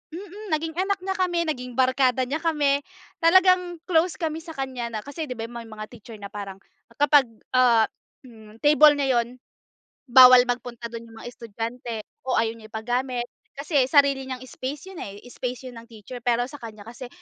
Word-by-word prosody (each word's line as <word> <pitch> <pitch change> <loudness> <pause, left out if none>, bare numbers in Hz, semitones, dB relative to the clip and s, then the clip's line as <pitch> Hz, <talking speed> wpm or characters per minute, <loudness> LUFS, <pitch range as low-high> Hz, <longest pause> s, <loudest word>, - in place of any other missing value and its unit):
mm, 405 +3 -9
naging 320 +1 -2
anak 390 +1 0
niya 385 0 -2
kami, 360 -2 0
naging 250 -5 -4
barkada 260 0 +3
niya 285 +4 -1
kami, 290 -4 +1 0.4
talagang 360 0 +4
close 335 0 +3
kami 320 -2 -2
sa 325 0 -10
kanya 260 -3 -4
na 215 - -2
kasi, 300 +3 -5
'di - - -2
ba, 225 - -4
may 235 -1 -8
mga 215 -1 -8
teacher 230 -1 -12
na 200 - -7
parang 200 -2 -7 0.4
kapag, 290 -1 +5 0.3
ah, 240 -3 +5 0.4
hmm, 220 -2 -15
table 300 0 +7
niya 270 -3 +2
yun, 245 +2 -10 0.7
bawal 255 0 +9
magpunta 245 -1 -4
dun 230 0 -7
yung 225 - -14
mga 240 - -7
estudyante 230 +1 -6 0.3
o 255 - +2
ayaw 225 0 0
niya 220 -1 -14
ipagamit. 245 +2 -2 0.3
Kasi 280 -2 +1
sarili 280 -2 +4
niyang 255 -1 -5
space 280 +8 -7
yun, 360 - -9
eh, 200 0 -7
space 250 +1 -5
yun 240 - -12
ng 230 - -19
teacher. 230 +2 -10
Pero 245 0 +1
sa 290 0 -11
kanya 215 -3 -9
kasi 245 +2 -9
255 Hz, 185 wpm, -24 LUFS, 235-300 Hz, 0.7 s, bawal